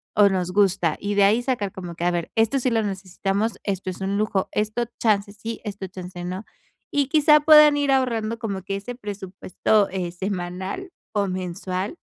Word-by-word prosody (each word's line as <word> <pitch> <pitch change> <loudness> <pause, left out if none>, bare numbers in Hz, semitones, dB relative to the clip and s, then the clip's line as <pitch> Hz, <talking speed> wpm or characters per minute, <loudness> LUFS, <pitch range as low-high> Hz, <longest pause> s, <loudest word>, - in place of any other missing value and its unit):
o 205 0 +6
nos 180 -2 -1
gusta" 180 -5 +2
y 205 +1 -2
de 200 - +5
ahí 215 +4 +4
sacar 220 -7 -1
como 175 -2 -7
que: 170 - -5
"A 175 - +3
ver, 170 -1 -3
esto 225 +5 +2
sí 255 -1 0
lo 225 -1 +2
necesitamos, 195 +2 -2
esto 195 -2 -2
es 185 - -10
un 195 +1 -1
lujo, 205 -2 0
esto 215 +3 -1
chance 205 -2 +1
sí, 225 +2 -6
esto 205 -3 -5
chance 180 -1 -8
no". 185 +4 -4 0.5
Y 285 -2 +1
quizá 300 0 +5
puedan 300 -1 +8
ir 285 -1 +1
ahorrando 230 -4 0
como 200 -5 -4
que 195 +1 -3
ese 235 +5 -7
presupuesto, 205 -1 -1
eh, 180 -2 -3
semanal 190 - -4 0.2
o 205 -2 +1
mensual, 185 - -3
200 Hz, 190 wpm, -23 LUFS, 185-225 Hz, 0.5 s, puedan